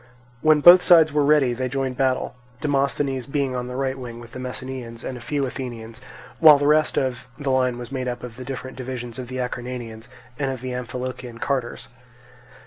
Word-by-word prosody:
When 155 -1 +4
both 175 +3 +10
sides 160 -4 +6
were 150 -1 +3
ready 140 -4 +4
they 130 +1 -3
joined 135 0 -2
battle; 130 0 0 0.3
Demosthenes 140 -2 0
being 140 -2 -1
on 125 0 -3
the 125 - -6
right 135 0 -1
wing 120 -3 -8
with 120 0 -12
the - - -8
Messenians 125 -2 -6
and 130 - -5
a 120 - -9
few 145 +1 -1
Athenians, 120 -3 -7 0.4
while 155 -3 +9
the 145 - -1
rest 150 +1 +3
of 125 -2 -1
the 145 -3 -2
line 130 -2 +1
was 120 +1 -8
made 130 -2 -3
up 120 -1 -4
of 120 -2 -8
the 130 - -8
different 130 0 -7
divisions 125 -2 -6
of 125 - -6
the 130 +1 -6
Acarnanians, 125 -2 -5 0.3
and 135 -2 0
of 130 -2 -5
the 130 0 -4
Amphilochian 125 -1 -6
carters. 130 -3 -3
130 Hz, 200 wpm, -23 LUFS, 125-140 Hz, 0.4 s, both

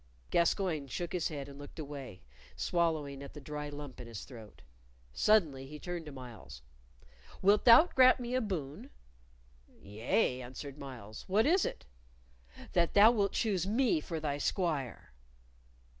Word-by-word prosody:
Gascoyne 170 -4 +1
shook 170 +6 -4
his 180 -3 0
head 140 -3 -6
and 140 0 -11
looked 145 - -11
away, 140 - -8 0.3
swallowing 155 -5 -1
at 140 - -10
the - - -7
dry 150 +1 -6
lump 145 -3 -8
in 120 - -10
his 115 -3 -7
throat. 115 -5 -13 0.5
Suddenly 155 -11 +2
he 150 +2 -9
turned 175 0 -6
to - - -7
Myles. 120 - -11 0.8
"Wilt 205 +2 +4
thou 240 +7 +9
grant 255 -6 +5
me 245 0 -4
a 255 - +2
boon?" 155 - -5 0.9
"Yea," 120 - 0
answered 135 +3 -8
Myles. 120 -6 -9
"What 210 +4 +3
is 350 +4 +3
it?" - - -5 0.9
"That 170 -2 +2
thou 210 +3 +8
wilt 200 -4 0
choose 195 -5 0
me 260 - +2
for 165 -3 -4
thy 145 -2 -2
squire." 145 - -2
150 Hz, 150 wpm, -32 LUFS, 135-195 Hz, 0.9 s, thou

